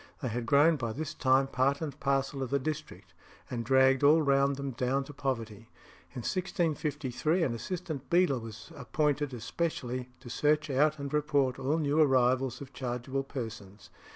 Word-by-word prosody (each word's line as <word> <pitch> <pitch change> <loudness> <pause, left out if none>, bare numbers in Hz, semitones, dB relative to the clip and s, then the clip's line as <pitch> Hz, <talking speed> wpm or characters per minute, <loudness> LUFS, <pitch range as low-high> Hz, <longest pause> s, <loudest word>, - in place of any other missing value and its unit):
They 130 - 0
had 115 +1 -3
grown 150 +5 +5
by 115 -4 -3
this 155 +4 -4
time 130 +1 +3
part 135 +1 +1
and 150 -3 -5
parcel 135 0 0
of 130 - -2
the 140 - +2
district, 140 - -5 0.4
and 120 -2 -2
dragged 130 +1 +4
all 150 +3 +7
round 140 0 +3
them 140 0 -4
down 130 +2 0
to 145 - -11
poverty. 115 -6 -4 0.4
In 125 - -6
1653 160 -3 -1
an 130 - 0
assistant 155 +2 -5
beadle 170 -7 +3
was 110 -1 -10
appointed 145 -1 -1
specially 125 -3 -3
to 130 - -12
search 150 +4 +1
out 150 +3 +3
and 140 0 -6
report 145 -3 +1
all 135 +4 0
new 150 0 +2
arrivals 130 -2 +2
of 140 -1 -10
chargeable 125 +1 -3
persons. 110 -8 -8
135 Hz, 165 wpm, -30 LUFS, 125-150 Hz, 0.4 s, all